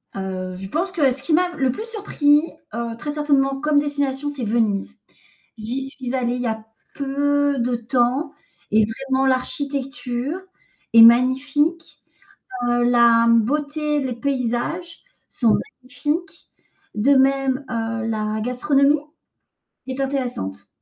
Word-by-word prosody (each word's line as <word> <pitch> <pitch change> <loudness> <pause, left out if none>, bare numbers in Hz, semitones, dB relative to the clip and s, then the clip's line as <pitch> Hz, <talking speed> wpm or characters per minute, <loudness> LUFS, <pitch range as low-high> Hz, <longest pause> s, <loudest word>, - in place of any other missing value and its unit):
Heu, 185 -1 -4
je 190 +1 -7
pense 350 - -2
que 295 -8 +2
ce 260 +1 -1
qui 325 - 0
m'a 355 +3 +3
le 265 -2 +2
plus 435 - -6
surpris, 300 -9 +2 0.3
heu, 235 0 -3
très 295 +4 -4
certainement 280 -2 +1
comme 300 0 +2
destination, 285 -1 -2
c'est 275 -4 -5
Venise. 215 -1 -1 0.6
J'y 230 +5 -3
suis 260 -2 -6
allée 245 -1 0
il 250 - -4
y 245 - -1
a 220 0 -4 0.3
peu 285 0 0
de 240 +1 0
temps 245 +5 0 0.4
et 215 0 +4
vraiment, 265 +4 -1
l'architecture 275 +2 -2 0.5
est 230 - +9
magnifique. 275 +7 +3 0.7
Heu, 240 0 +2
la, 235 -1 +5
mmh, 230 -1 +5
beauté, 295 +3 -1
les 260 -3 -3
paysages 280 +7 -3 0.3
sont 230 -4 +2 0.3
magnifiques. 295 +7 -4 0.4
De 235 +7 +3
même, 270 0 +2
heu, 230 -1 -2
la 215 -1 -2
gastronomie 275 +4 +2 0.9
est 260 +1 -5
intéressante. 245 - -3
265 Hz, 135 wpm, -21 LUFS, 235-285 Hz, 0.9 s, est